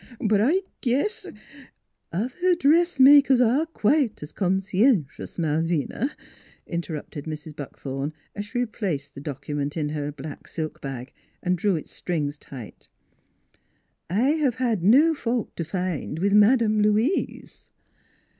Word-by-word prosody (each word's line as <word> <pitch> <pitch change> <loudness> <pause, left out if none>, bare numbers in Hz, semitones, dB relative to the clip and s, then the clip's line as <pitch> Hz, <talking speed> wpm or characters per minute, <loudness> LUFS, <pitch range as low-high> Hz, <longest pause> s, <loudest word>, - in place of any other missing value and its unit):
But 210 -2 +2
I 320 - +3 0.2
guess 280 - 0 0.3
" - - -21
" - - -53
Other 260 - 0
dressmakers 285 -4 +6
are 255 +7 +3
quite 275 - +1
as 150 - -9
con 190 -1 +1
scien 195 - +3
tious, - - -9
Malvina," 165 - 0 0.6
interrupted 160 -3 -5
Mrs. 155 -1 -7
Buckthorn, 140 0 -5 0.2
as 205 0 -5
she 225 - -5
replaced 190 - -2
the 140 - -9
document 145 +1 -4
in 150 -2 -1
her 150 -1 -3
black 145 0 -9
silk 155 -2 -5
bag 135 -1 -6 0.3
and 180 0 +2
drew 190 +2 +1
its 155 - -6
strings 150 -4 -3
tight. 125 -6 -11 1.2
u 180 - -3
I 250 +5 +3
have 275 -6 +1
had 240 -7 0
no 280 - +6
fault 240 -5 -2
to 170 - -3
find 170 -2 -3
with 200 +4 +1
Madam 215 0 +5
Louise." 215 - 0
195 Hz, 140 wpm, -25 LUFS, 150-250 Hz, 1.2 s, dressmakers